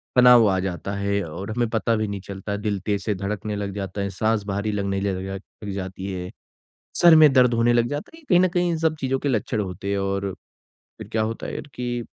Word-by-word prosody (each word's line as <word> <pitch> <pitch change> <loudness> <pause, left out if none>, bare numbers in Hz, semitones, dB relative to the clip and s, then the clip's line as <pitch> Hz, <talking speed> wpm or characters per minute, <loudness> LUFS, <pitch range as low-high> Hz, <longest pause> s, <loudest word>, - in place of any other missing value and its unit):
तनाव 125 -3 +7
आ 95 -1 +1
जाता 95 +1 -3
है 100 0 0
और 95 +7 -6
हमें 120 0 0
पता 115 0 +1
भी 110 -1 -1
नहीं 100 -2 -5
चलता, 100 +1 -5
दिल 105 -1 -2
तेज़ 100 -2 0
से 105 - -1
धड़कने 105 +2 -3
लग 100 -1 -4
जाता 100 0 -4
है, 100 - -1
साँस 110 +2 0
भारी 100 +2 -1
लगने 100 -1 -1
ल - - -3
लग 95 +1 -5 0.2
लग 100 - -4
जाती 95 0 -5
है, 90 -1 -5 0.6
सर 170 -2 +7
में 155 -2 +8
दर्द 125 -2 +5
होने 115 +1 +3
लग 120 0 +3
जाता 145 +1 -5
है, - - -14
ये 320 - -22
कहीं 175 - +6
न 185 - +5
कहीं 175 0 +1
इन 165 - -1
सब 160 0 +1
चीज़ों 135 0 0
के 145 - -1
लक्षण 110 -2 0
होते 95 0 -5
हैं। 100 - 0
और 100 0 -2 0.7
फिर - - -9
क्या 110 -1 +1
होता 115 +1 -3
है - - -4
कि, 120 -1 -3
105 Hz, 240 wpm, -23 LUFS, 100-120 Hz, 0.7 s, में